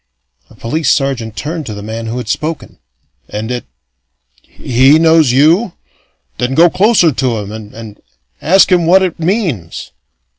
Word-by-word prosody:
A - - -18
police 155 +7 -2
sergeant 130 -6 -1
turned 155 0 -5
to 105 - -6
the 100 - -8
man 110 +1 -6
who 115 +2 -4
had 125 - -6
spoken. 155 +7 -4 0.5
"And 110 +3 -5
it 125 -1 -4 0.8
he 130 +5 +2
knows 160 -4 +3
you? 165 - +2 0.7
Then 125 +2 -2
go 170 +2 +5
closer 195 -4 +3
to 125 -3 -1
him, 105 -1 -6
and 110 -1 -9
and 110 -2 -11 0.4
ask 190 +4 +3
him 175 -2 +2
what 190 +2 +5
it 180 -2 -3
means." 165 - -3
140 Hz, 155 wpm, -13 LUFS, 115-165 Hz, 0.8 s, go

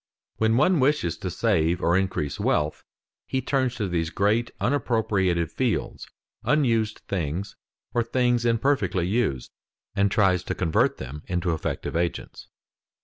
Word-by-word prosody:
When 110 +1 +2
one 165 +5 +4
wishes 130 - +2
to - - -3
save 80 +2 +1
or 85 -1 +2
increase 95 -7 -1
wealth, 75 +1 0 0.4
he 130 - -1
turns 130 -1 0
to 105 - -2
these 85 -2 -1
great 105 +7 +1
unappropriated 100 - +1
fields, - - -2 0.4
unused 115 -8 +1
things 90 +1 -3 0.4
or 120 - +2
things 120 0 +1
imperfectly 115 -6 +1
used, 95 - -1 0.4
and 100 0 +3
tries 95 -3 +3
to - - -3
convert 80 -4 +1
them 70 +3 -7
into 90 -2 0
effective 80 - -3
agents. 85 0 -3
100 Hz, 135 wpm, -25 LUFS, 85-120 Hz, 0.4 s, one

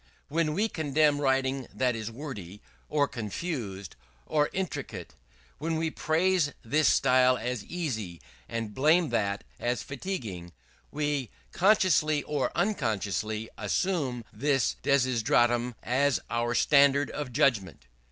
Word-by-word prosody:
When 155 0 0
we 215 +4 +2
condemn 150 -4 +1
writing 135 -1 +1
that 125 -2 0
is 110 -1 -4
wordy, 115 - -8 0.3
or 145 -2 +2
confused, 110 - -5 0.3
or 150 -1 +1
intricate 190 -2 -5 0.5
when 165 +2 -1
we 160 0 -1
praise 165 -1 +1
this 150 +6 +2
style 130 -1 +4
as 120 -2 -3
easy, 110 - -4 0.3
and 115 -2 -4
blame 155 - +3
that 100 -1 -1 0.2
as 120 +1 -1
fatiguing, 115 - -5 0.4
we 145 -5 -2 0.2
consciously 175 -6 +3
or 145 -3 -1
unconsciously 110 - -1
assume 125 - -1
this 135 +2 +1
desideratum 120 -2 +2
as 130 +1 +2
our 120 +1 0
standard 140 +1 +4
of 145 -4 -5
judgment. 105 - +1
135 Hz, 115 wpm, -28 LUFS, 115-150 Hz, 0.5 s, style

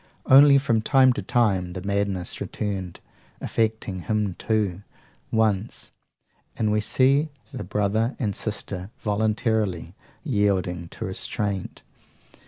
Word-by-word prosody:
Only, 140 +1 +8
from 120 -5 +1
time 130 +1 +5
to - - -4
time, 95 -8 +1
the 95 - -5
madness 100 -3 -2
returned, 95 -4 -4 0.4
affecting 110 -4 -1
him 105 +1 -1
too, 105 -3 -1 0.5
once; 110 -1 0 0.7
and 110 -1 +1
we 105 0 +2
see 135 +7 +2 0.2
the 125 - -5
brother 105 +5 0
and 105 -6 -2
sister 100 -3 -5
voluntarily 105 -4 0 0.3
yielding 100 - 0
to - - -6
restraint. 95 +1 -4
105 Hz, 110 wpm, -24 LUFS, 95-115 Hz, 0.7 s, Only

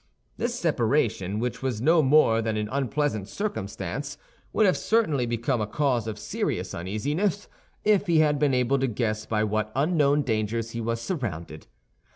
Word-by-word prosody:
This 240 0 -2
separation, 115 - +1
which 120 +2 -3
was 130 -5 -2
no 160 +7 +4
more 135 -5 +4
than 110 -1 -1
an 105 0 -1
unpleasant 135 -6 -1
circumstance, 205 - -4 0.3
would 220 - +3
have 185 - +4
certainly 160 - +1
become 120 +1 -1
a 105 - -1
cause 125 -2 0
of 110 -1 -4
serious - - -3
uneasiness 145 - -2 0.4
if 210 -1 +3
he 170 -2 +3
had 150 -2 +3
been 140 -3 +2
able 125 +2 +2
to 135 - +1
guess 110 -2 -2
by 110 -1 +1
what 110 0 -1
unknown 145 -1 +2
dangers 115 -1 -1
he 115 - -4
was 115 +1 -2
surrounded. 105 - -5
125 Hz, 165 wpm, -26 LUFS, 110-150 Hz, 0.4 s, no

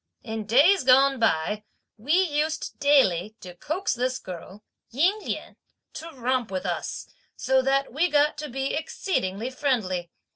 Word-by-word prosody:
In 220 -2 -5
days 295 - +5
gone 270 +1 +5
by, 210 0 0 0.3
we 245 +8 -2
used 310 -3 -1
daily 220 - +3
to 180 -1 -9
coax 315 - -2
this 255 +1 -1
girl, 185 +2 -10 0.3
Ying 350 - +2
Lien, - - -6 0.4
to 330 - -8
romp 255 -2 -1
with 190 -1 -4
us, - - -4 0.3
so 265 0 +2
that 270 -1 0
we 335 +6 +1
got 295 0 +3
to 300 - -5
be 270 +2 -3
exceedingly 255 - -2
friendly. 210 - -1
260 Hz, 145 wpm, -25 LUFS, 210-295 Hz, 0.4 s, days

